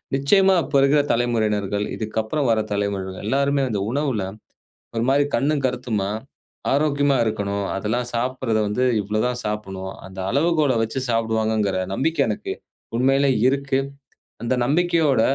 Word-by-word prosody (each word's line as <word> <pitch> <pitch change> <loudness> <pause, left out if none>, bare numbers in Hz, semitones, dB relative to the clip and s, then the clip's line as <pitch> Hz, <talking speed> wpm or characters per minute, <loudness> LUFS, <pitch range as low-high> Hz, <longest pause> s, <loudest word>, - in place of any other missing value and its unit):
நிச்சயமா, 190 +8 +4
அப்போ 140 +1 -2
இருக்கிற 140 +2 +4
தலைமுறையினர்கள், 105 -4 0
இதுக்கு 110 0 -4
அப்புறம் 140 +5 -1
வர 110 -1 +3
தலைமுறைகள் 100 -2 -2
எல்லாருமே 140 +3 +1
அந்த 105 - -1
உணவுல, 135 -6 0 0.7
ஒரு 115 - +1
மாரி 140 +1 +4
கண்ணும் 145 0 +1
கருத்துமா, 120 -6 -2 0.6
ஆரோக்கியமா 145 -1 +2
இருக்கணும். 100 -2 -2
அதெல்லாம் 120 +5 -1
சாப்பட்றத 125 -2 0
வந்து 125 +5 0 0.2
இவ்ளோ 105 +2 -1
தான் 125 0 -2
சாப்டணும். 95 -3 -4
அந்த 95 0 -12
அளவுகோல 150 -1 +2
வச்சி 110 +4 -2
சாப்டுவாங்கங்கிற 110 -3 0 0.2
நம்பிக்கை 160 +3 +1
எனக்கு 105 - -3 0.5
உண்மையிலேயே 135 0 +3
இருக்கு. 140 0 0 0.6
அந்த 120 - 0
நம்பிக்கையோட 155 -3 +2
120 Hz, 130 wpm, -22 LUFS, 105-140 Hz, 0.7 s, நிச்சயமா